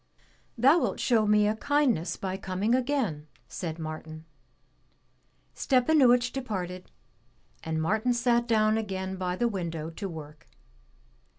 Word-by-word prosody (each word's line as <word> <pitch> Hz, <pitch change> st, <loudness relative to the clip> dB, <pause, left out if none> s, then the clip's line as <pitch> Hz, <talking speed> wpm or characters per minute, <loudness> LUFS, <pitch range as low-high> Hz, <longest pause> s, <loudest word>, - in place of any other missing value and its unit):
"Thou 275 Hz, +8 st, +5 dB
wilt -, -, -2 dB
show 225 Hz, -4 st, +2 dB
me 210 Hz, 0 st, +4 dB
a 215 Hz, -, +1 dB
kindness 235 Hz, -, 0 dB
by 190 Hz, -1 st, -3 dB
coming 195 Hz, +4 st, -1 dB
again," 245 Hz, -, -1 dB, 0.2 s
said 165 Hz, -3 st, -5 dB
Martin. 155 Hz, 0 st, -7 dB, 1.3 s
Stepanuich 250 Hz, -2 st, +3 dB
departed, 185 Hz, -8 st, -5 dB, 0.7 s
and 160 Hz, 0 st, -2 dB
Martin 220 Hz, +9 st, +1 dB
sat 240 Hz, 0 st, +1 dB
down 215 Hz, -1 st, +3 dB
again 190 Hz, -3 st, -4 dB
by 180 Hz, -1 st, -2 dB
the 240 Hz, +5 st, +1 dB
window 165 Hz, -6 st, -4 dB
to 195 Hz, +4 st, -6 dB
work. 150 Hz, -2 st, -10 dB
210 Hz, 120 wpm, -28 LUFS, 170-240 Hz, 1.3 s, Thou